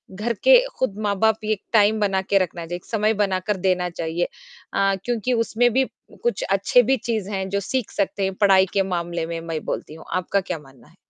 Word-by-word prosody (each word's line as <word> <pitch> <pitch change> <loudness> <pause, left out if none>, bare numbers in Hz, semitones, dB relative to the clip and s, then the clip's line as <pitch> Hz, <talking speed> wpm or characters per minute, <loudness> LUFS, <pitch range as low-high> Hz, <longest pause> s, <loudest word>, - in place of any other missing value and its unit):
घर 230 +4 -1
के - - +8 0.2
खुद 210 -6 -1
माँ-बाप 205 +1 +2
एक 215 -2 -1
टाइम 215 0 +4
बना 195 -2 +1
के 195 +1 +1
रखना 175 -2 -1
चाहिए, 175 +2 -5
एक 175 - -10
समय 220 0 +1
बना 195 -3 0
कर 205 +1 -2
देना 180 -1 +1
चाहिए 170 0 -2 0.5
अ, 195 0 +2
क्योंकि 245 +1 0
उसमें 230 +1 +2
भी 265 0 +3 0.4
कुछ 480 - 0
अच्छे 195 +5 +4
भी 265 +3 +2
चीज़ 215 -3 -3
हैं 190 -1 -2
जो 200 +1 0
सीख 255 +3 -2
सकते 200 0 -1
हैं, 190 0 0
पढ़ाई 190 -2 +5
के 195 -1 +3
मामले 170 -2 -2
में 165 0 -4
मैं 165 -2 -4
बोलती 155 - -4
हूँ। 160 - -12
आपका 185 +2 0
क्या 180 -3 -4
मानना 135 -3 -18
है? 170 - -23
195 Hz, 215 wpm, -23 LUFS, 180-215 Hz, 0.5 s, के